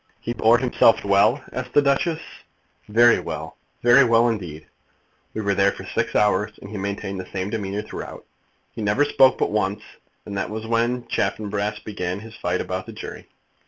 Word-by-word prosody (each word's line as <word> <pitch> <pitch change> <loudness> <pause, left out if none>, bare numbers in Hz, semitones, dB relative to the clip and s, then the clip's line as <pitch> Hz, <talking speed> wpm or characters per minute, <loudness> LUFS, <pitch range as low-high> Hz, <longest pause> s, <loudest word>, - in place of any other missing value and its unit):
"He 120 - -4
bore 115 0 +4
himself 120 -2 +3
well?" 100 +7 +3
asked 125 0 -5
the 145 - +7
Duchess. 140 +4 +1 0.7
"Very 120 +3 +5
well, - - -6 0.3
very 120 +3 +7
well 115 -1 +4
indeed. 85 -9 -5 0.7
We 110 - -2
were 100 -1 +1
there 100 0 +3
for - - -10
six - - -2
hours, 105 0 +2
and 100 - -11
he 105 - -5
maintained 100 0 -4
the 95 - -8
same 95 +1 -3
demeanour 105 -2 -3
throughout. - - -8 0.5
He - - -7
never 105 +8 +2
spoke 135 -2 +4
but - - 0
once, 105 0 -1 0.4
and 100 - -6
that - - -3
was 110 +1 -5
when 120 +2 0
Chaffanbrass 105 -1 -2
began 95 -3 -4
his 115 0 -11
fight 90 -3 -2
about 95 +1 -4
the - - -8
jury." - - -9
105 Hz, 180 wpm, -23 LUFS, 100-120 Hz, 0.7 s, the